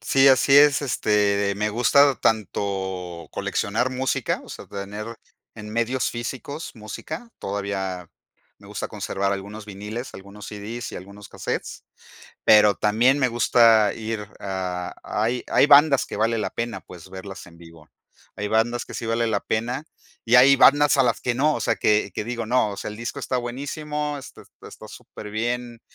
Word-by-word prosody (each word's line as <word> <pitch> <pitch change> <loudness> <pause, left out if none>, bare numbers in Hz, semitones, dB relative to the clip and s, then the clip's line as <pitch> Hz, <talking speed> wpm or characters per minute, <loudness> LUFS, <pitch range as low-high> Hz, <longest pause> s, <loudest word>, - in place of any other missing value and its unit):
Sí, 135 +4 +4
así 135 +1 +5
es. 145 0 +6
Este, 105 -5 +1
me 105 +1 0
gusta 135 +6 +4
tanto 95 -5 -2
coleccionar 115 +5 -1
música, 130 0 -1
o - - -15
sea, - - -9
tener 100 +2 -7 0.5
en 105 -1 -9
medios 115 +3 0
físicos 130 +6 -6
música, 115 - -8
todavía 95 -3 -4 0.5
me - - -16
gusta - - -5
conservar 100 0 -2
algunos 100 +2 -6
vinilos, 105 +5 -7
algunos 100 +1 -11
CDs 110 +3 -7
y - - -6
algunos 100 +2 -11
casetes. - - -5 0.6
Pero 105 -1 +6
también 120 +6 +3
me 130 - +3
gusta 115 -3 +4
ir 110 -2 -5
a 90 -2 -4
hay 115 +4 -1
hay - - +5
bandas 145 -1 +6
que - - -7
vale 115 +1 +1
la - - -2
pena, 115 0 -4
pues, 90 0 -13
verlas 95 +1 -9
en 85 -1 -16
vivo. 85 -2 -16 0.5
Hay 105 - -3
bandas 115 +3 0
que - - -11
sí 115 - -5
vale 115 +1 0
la 105 -3 0
pena 120 +6 -2 0.4
y 120 +2 +3
hay 135 +2 +8
bandas 145 +2 +5
a 135 - +5
las 120 -2 +1
que 125 - -1
no, 150 +4 +2
o - - -3
sea, - - 0
que 105 -1 +1
que - - -3
digo 115 0 -4
no. 120 -1 +2
O 100 - -8
sea - - -5
el 105 - -8
disco 120 +4 -5
está 130 - -3
buenísimo. 145 +4 -4
Está 135 - -12 0.2
está - - -12
súper 105 - -11
bien 120 +2 -3
110 Hz, 170 wpm, -23 LUFS, 100-125 Hz, 0.6 s, hay